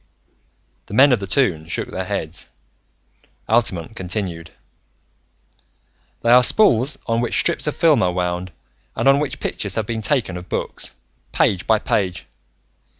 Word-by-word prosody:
The 105 - -7
men 140 +4 +7
of 120 - +2
the 100 - -6
Toon 90 - +1
shook - - -4
their - - -4
heads. - - -5 1.0
Altamont 110 -4 0
continued: 90 -4 -5 1.7
"They 115 - +3
are 125 +1 +8
spools 130 - +3
on 115 0 0
which 120 - 0
strips 170 -2 0
of 150 - -1
films 160 -4 +4
are 90 - +2
wound 90 0 -2 0.4
and - - 0
on 135 +1 +6
which 150 -2 -3
pictures 100 -2 -3
have 110 - -1
been 115 0 -3
taken 110 -7 -1
of 90 0 -10
books, - - -4 0.4
page 95 -3 +1
by 110 - +4
page. 95 -4 -1
110 Hz, 150 wpm, -20 LUFS, 90-125 Hz, 1.7 s, are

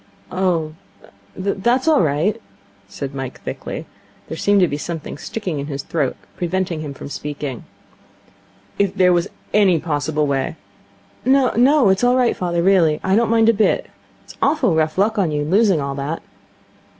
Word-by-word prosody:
'Oh, 175 -4 0 0.6
that's 200 +8 0
all 315 -2 +5
right,' 170 +9 0 0.5
said 135 +7 -6
Mike 135 -2 -6
thickly. - - -6 0.4
There - - -5
seemed 200 +4 +3
to 180 - +5
be 145 -1 -4
something 155 -1 -6
sticking 185 -8 -4
in 140 - -4
his 140 -2 -4
throat, 145 -6 -1 0.2
preventing 175 -2 -2
him 145 -3 -6
from - - -8
speaking. 145 -2 -5 1.1
'If 200 -1 +1
there 180 -2 +4
was 175 +2 +1 0.3
any 195 -5 +4
possible 150 -1 -1
way 140 +3 -1 0.4
' - - -33
'No, 260 -1 +4
it's 190 +4 +2
all 245 +1 +4
right, 250 -2 +2
father, 170 -1 -1
really. 175 -5 +4
I 190 - +2
don't 230 +1 +2
mind 225 0 +4
a - - +5
bit. 215 0 +1 0.3
It's - - -14
awfully 275 - +2
rough 155 +1 0
luck 210 +3 +2
on 185 -5 +2
you 150 -1 -1
losing 195 +1 +3
all 140 -1 -3
that.' 140 +4 -4
175 Hz, 165 wpm, -20 LUFS, 150-210 Hz, 1.1 s, all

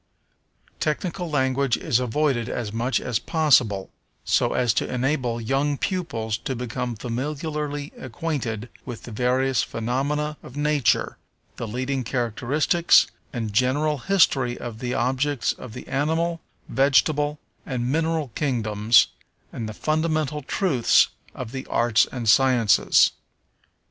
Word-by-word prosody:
Technical 170 +3 -2
language 130 -3 +1
is 120 - +1
avoided 125 -1 0
as 110 -4 -4
much 120 +3 0
as 120 -3 -1
possible, 125 - +2 0.3
so - - +2
as 120 -3 +2
to - - -1
enable 125 -2 0
young 135 +5 0
pupils 115 - -2
to 130 - -4
become 125 0 -4
familiarly 145 +4 -4
acquainted 125 -4 -4
with 120 -3 -8
the 120 - -9
various 125 +2 +1
phenomena 145 +6 -2
of 130 - -11
nature, 145 -6 +1 0.4
the 115 - -4
leading 130 +4 -2
characteristics 130 - +2 0.3
and 115 -5 -4
general 140 +6 +1
history 135 -9 +2
of 115 -2 -7
the 125 0 -2
objects 130 +2 0
of 125 -4 -10
the - - -9
animal, 160 +4 0 0.3
vegetable, 145 +2 +2 0.3
and 125 -1 -2
mineral 160 -2 0
kingdoms, 115 -5 +3 0.5
and 110 -2 -4
the - - -4
fundamental 155 +2 -1
truths 140 - +3 0.3
of 120 -3 -6
the 130 0 -6
arts 120 -1 +3
and 120 -3 -4
sciences. 125 -2 +5
130 Hz, 125 wpm, -24 LUFS, 120-150 Hz, 0.5 s, sciences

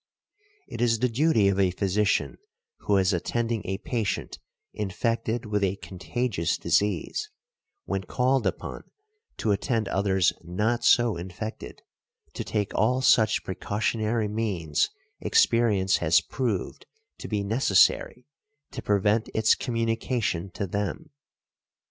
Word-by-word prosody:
It - - -6
is 115 -1 +3
the 125 +3 +1
duty 115 -4 +3
of 100 0 +1
a 95 -1 +4
physician 100 +2 0 0.4
who 100 - +1
is 95 0 +2
attending 115 +5 -1
a 95 +1 -2
patient 115 -2 -3 0.3
infected 115 +3 -2
with 105 -1 -1
a 95 0 +1
contagious 95 +1 -2
disease, 105 - 0 0.6
when 95 -1 -3
called 130 +5 +1
upon - - -5 0.5
to 110 - 0
attend 110 +1 0
others 95 -3 +2
not 105 +8 -1
so 120 -5 +4
infected, 95 +5 -7 0.5
to - - -4
take 105 -2 -2
all 125 +4 +1
such 110 -4 +4
precautionary 110 +3 -1
means 100 -8 -1 0.3
experience 105 -5 +3
has 80 -1 +4
proved 115 -8 -3 0.3
to - - -7
be 105 -2 -1
necessary 115 +2 +2 0.5
to - - -6
prevent 105 +2 +1
its 110 0 +4
communication 115 -5 -1
to 100 - -2
them. 100 - -4
105 Hz, 120 wpm, -26 LUFS, 95-115 Hz, 0.6 s, a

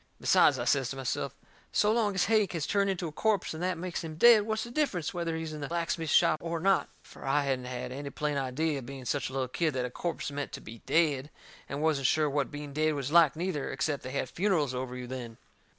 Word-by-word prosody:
Besides, 140 - +5
I 120 - -3
says 130 0 +2
to 135 - -4
myself, 135 +1 -3 0.4
"so 210 - +3
long 215 -3 +1
as 185 - +2
Hank 215 -2 +2
has 160 -3 -2
turned 200 -1 +1
into 180 -3 -2
a - - -6
corpse 205 +3 0
and 160 - -6
that 180 -1 0
makes 180 +1 -4
him 160 -1 -6
dead, 220 +4 +7
what's 220 0 -1
the 235 - -8
difference 240 - -1
whether 170 -2 -2
he's 160 -1 -5
in 150 - -6
the 145 - -3
blacksmith 165 -1 -2
shop 155 - +4
or 170 0 -3
not?" 195 +2 +2
Fur - - -14
I 135 +2 +2
hadn't 130 -2 -1
had 125 0 -5
any 140 +2 -5
plain 150 +1 -2
idea, 140 +2 -1
being 130 +1 -8
such 140 +2 -1
a - - -10
little 135 -1 -1
kid, 155 +3 -1
that 125 -1 0
a 125 - -5
corpse 165 0 -3
meant 145 0 -4
to - - -5
be 115 +2 -11
dead, 150 -4 +2 0.4
and 140 +2 -3
wasn't 145 -5 +2
sure 155 +2 +3
what 140 -1 0
being 145 -1 -7
dead 155 +1 +1
was 140 0 -3
like, 165 -3 +6
neither, 165 -4 -2
except 140 +1 -1
they 130 - -7
had 130 0 -2
funerals 170 -8 +1
over 125 0 -4
you 125 0 -6
then. 120 -3 -7
150 Hz, 245 wpm, -30 LUFS, 135-170 Hz, 0.4 s, dead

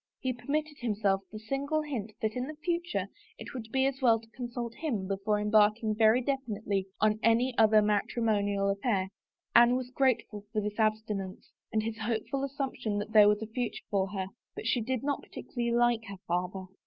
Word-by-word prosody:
He 260 -1 -1
permitted 295 +4 -3
himself 205 -4 +1
the 215 - -7
single 275 +7 -1
hint 225 -8 -4
that 215 0 +1
in 250 +1 -2
the 310 - -7
future 345 +2 -2 0.3
it - - -9
would 225 -3 -7
be 265 0 +2
as 270 0 -1
well 230 -3 +5
to 225 - -18
consult 240 -2 -5
him 230 -12 -3
before 200 +2 0
embarking 215 +1 +3
very 220 +3 +4
definitely 215 -8 -2
on 215 0 +2
any 235 +3 +3
other 215 -1 +6
matrimonial 205 -1 +1
affair. 195 -2 0 0.5
Anne 240 +1 +7
was 255 -1 -3
grateful 240 -6 0
for 215 - 0
this 210 +1 -4
abstinence 215 -3 -1 0.2
and 215 -1 +1
his 225 0 -4
hopeful 230 +5 -2
assumption 265 -6 -2
that 205 +1 -4
there 210 -1 +8
was 210 +1 +1
a - - -3
future 235 +2 -4
for 195 -2 +2
her, 190 -1 -3 0.3
but - - -7
she 235 +1 +2
did 255 +2 -2
not 285 0 -1
particularly 240 -2 -4
like 240 -1 +2
her 200 -3 -8
father. 180 +2 -2
225 Hz, 185 wpm, -30 LUFS, 210-255 Hz, 0.5 s, there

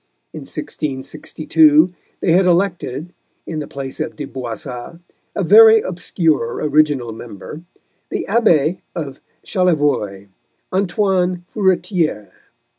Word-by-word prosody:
In - - -8
1662 150 +3 +1 0.3
they 175 - +2
had 180 +2 +4
elected 175 -3 0 0.3
(in 160 -2 -4
the 145 - -5
place 135 -1 -7
of 155 - -3
De 145 - -5
Boissat, 125 +3 -7 0.4
a 200 - 0
very 220 +4 +8
obscure 165 - -1
original 145 -5 +1
member) 115 +6 -9 0.5
the - - -3
Abbé 185 -7 +2
of 140 -5 -6 0.2
Chalivoy, 145 - 0 0.4
Antoine 185 -2 0
Furetière. 180 - 0
160 Hz, 105 wpm, -19 LUFS, 135-180 Hz, 0.5 s, very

